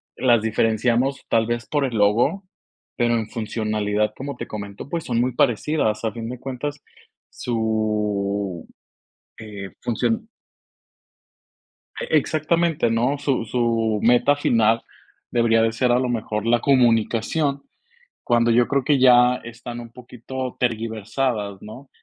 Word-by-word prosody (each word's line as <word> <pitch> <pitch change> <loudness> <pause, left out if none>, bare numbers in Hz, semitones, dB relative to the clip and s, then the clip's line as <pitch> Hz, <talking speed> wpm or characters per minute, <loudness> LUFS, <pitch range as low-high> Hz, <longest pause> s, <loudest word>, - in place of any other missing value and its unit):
las 120 -4 +3
diferenciamos 115 +4 +1
tal 115 -1 +3
vez 120 0 -3
por 145 -2 0
el 120 -3 -3
logo, 110 - +2 0.5
pero, 120 -1 +1
en 110 -1 -2
funcionalidad, 105 -1 -1
como 140 0 -5
te - - -6
comento, 100 +2 -7
pues, 170 -2 -3
son 120 -2 -1
muy 125 -1 0
parecidas. 120 -3 +1
A 110 - 0
fin 115 0 -6
de 125 -1 -7
cuentas, 140 +3 -5 0.5
su, 105 -4 -2 0.7
eh, 100 -3 -8
función. 225 - -1 1.7
E 485 - -5
exactamente, 160 -4 +1
¿no? 120 +5 +1
Su 135 -5 -1
su 115 -2 0
meta 125 +5 +4
final 115 -4 +2 0.5
debería 115 -1 +3
de 115 - +2
ser 125 +2 +1
a 125 - +4
lo 130 -1 0
mejor 110 -2 -2
la 120 0 +3
comunicación, 130 +3 +2 0.6
cuando 120 -1 +3
yo 120 +1 +4
creo 140 -2 +1
que 140 -1 +2
ya 125 -1 +6
están 120 +1 -8
un 115 -1 -10
poquito 125 +1 -7
tergiversadas, 110 -2 -2
¿no? 125 +6 -11
120 Hz, 135 wpm, -22 LUFS, 110-130 Hz, 1.7 s, ya